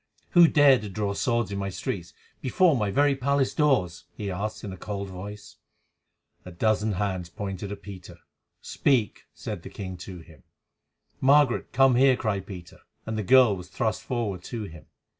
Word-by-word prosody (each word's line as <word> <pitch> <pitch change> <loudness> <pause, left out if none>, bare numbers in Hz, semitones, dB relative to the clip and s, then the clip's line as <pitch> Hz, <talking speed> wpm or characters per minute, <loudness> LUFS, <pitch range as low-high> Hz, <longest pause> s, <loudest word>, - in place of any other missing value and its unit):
"Who 175 -1 +7
dare 145 -4 +5
to 105 - -7
draw 100 +1 -2
swords 115 -1 0
in 100 - -3
my 100 0 -2
streets, 90 0 -5 0.3
before 160 +5 +3
my 105 -5 0
very 140 +6 +3
palace 135 0 0
doors?" 125 - +1
he 100 -2 -4
asked 105 +4 -4
in 100 - -6
a - - -7
cold 100 +1 -5
voice. 100 +3 -9 0.9
A 90 - -10
dozen 110 +3 0
hands 95 -3 -2
pointed 100 0 -6
at 100 - -8
Peter. 95 -4 -10 0.5
"Speak," 125 -7 0
said - - -6
the - - -9
king 95 -2 -7
to 90 +1 -9
him. 80 -5 -17 0.8
"Margaret, 140 -1 +3
come 135 -1 +4
here," 130 0 +5
cried 100 -6 -2
Peter; 90 -4 -10 0.3
and 110 - -4
the 110 - -1
girl 125 0 +5
was 90 -2 -9
thrust 110 +4 -2
forward 110 -7 -3
to 115 -3 -5
him. 80 -5 -11
105 Hz, 175 wpm, -26 LUFS, 95-125 Hz, 0.9 s, Who